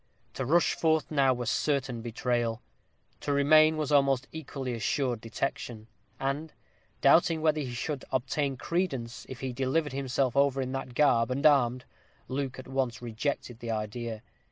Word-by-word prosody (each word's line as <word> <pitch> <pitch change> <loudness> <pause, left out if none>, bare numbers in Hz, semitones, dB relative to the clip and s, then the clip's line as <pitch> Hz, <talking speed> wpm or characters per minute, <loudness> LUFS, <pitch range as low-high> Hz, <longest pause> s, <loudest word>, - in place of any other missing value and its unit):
To 130 - -3
rush 170 +4 +4
forth 160 -2 +1
now 140 -3 +4
were 125 -1 -2
certain 135 -3 0
betrayal; 120 0 -1 0.6
to 145 - -3
remain 155 +2 +5
was 150 -2 -2
almost 135 -3 +3
equally 135 -5 -5
assured 120 0 -1
detection; 115 -1 -4 0.3
and, 145 +4 -2 0.5
doubting 165 -1 +5
whether 155 -1 +3
he 125 -4 -4
should 145 +2 -3
obtain 135 +1 -1
credence 135 -6 -2
if 130 - -8
he 130 -2 -3
delivered 135 +3 0
himself 135 -1 0
over 140 -1 +3
in 130 -1 -2
that 135 -2 -5
garb 125 -5 +4
and 130 +2 -2
armed, 130 -4 +4 0.4
Luke 135 -1 -3
at 130 - -9
once 130 -2 -1
rejected 120 +1 -3
the 120 -1 -6
idea. 110 +1 -4
135 Hz, 155 wpm, -29 LUFS, 120-145 Hz, 0.6 s, remain